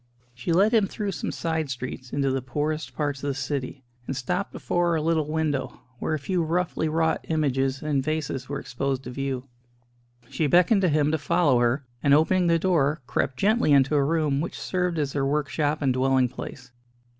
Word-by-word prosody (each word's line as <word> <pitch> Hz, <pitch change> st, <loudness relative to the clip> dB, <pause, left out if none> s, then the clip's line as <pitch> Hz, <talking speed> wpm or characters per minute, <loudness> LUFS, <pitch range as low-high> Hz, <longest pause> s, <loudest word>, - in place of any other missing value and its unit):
She 125 Hz, +7 st, -4 dB
led 200 Hz, +7 st, +4 dB
him 215 Hz, -4 st, +4 dB
through 205 Hz, 0 st, -3 dB
some 175 Hz, -, -4 dB
side 160 Hz, -3 st, -2 dB
streets 125 Hz, -1 st, -6 dB
into 140 Hz, -1 st, 0 dB
the 135 Hz, 0 st, -1 dB
poorest 150 Hz, +4 st, -3 dB
parts 145 Hz, -3 st, -2 dB
of -, -, -2 dB
the 140 Hz, -, 0 dB
city, 135 Hz, 0 st, -4 dB, 0.2 s
and 135 Hz, -, -2 dB
stopped 180 Hz, +9 st, -2 dB
before 175 Hz, -1 st, 0 dB
a 160 Hz, -, 0 dB
little 160 Hz, -2 st, +1 dB
window, 150 Hz, -4 st, -2 dB, 0.2 s
where 155 Hz, -, -1 dB
a -, -, -1 dB
few 175 Hz, +5 st, -1 dB
roughly 165 Hz, -1 st, 0 dB
wrought 160 Hz, 0 st, +1 dB
images 135 Hz, -4 st, 0 dB
and 145 Hz, -3 st, 0 dB
vases 150 Hz, -4 st, -3 dB
were 145 Hz, 0 st, -3 dB
exposed 135 Hz, +1 st, -3 dB
to 125 Hz, -, -7 dB
view. 135 Hz, 0 st, -3 dB, 0.8 s
She 155 Hz, -, -1 dB
beckoned 180 Hz, -, +4 dB
to 185 Hz, -, +3 dB
him 150 Hz, -1 st, +2 dB
to 160 Hz, -, 0 dB
follow 145 Hz, -4 st, +3 dB
her, 120 Hz, +3 st, +1 dB, 0.2 s
and 140 Hz, 0 st, +5 dB
opening 175 Hz, +4 st, +3 dB
the 170 Hz, 0 st, +4 dB
door, 160 Hz, -4 st, +1 dB
crept 130 Hz, +1 st, -1 dB
gently 210 Hz, -, +3 dB
into 135 Hz, +1 st, +4 dB
a 145 Hz, -1 st, +4 dB
room 150 Hz, -2 st, +1 dB
which 170 Hz, -, -5 dB
served 180 Hz, -2 st, -1 dB
as 145 Hz, -3 st, -1 dB
their 140 Hz, -, 0 dB
workshop 145 Hz, +1 st, 0 dB
and 135 Hz, -2 st, +2 dB
dwelling 130 Hz, 0 st, +2 dB
place. 125 Hz, 0 st, -9 dB
150 Hz, 195 wpm, -25 LUFS, 135-165 Hz, 0.8 s, and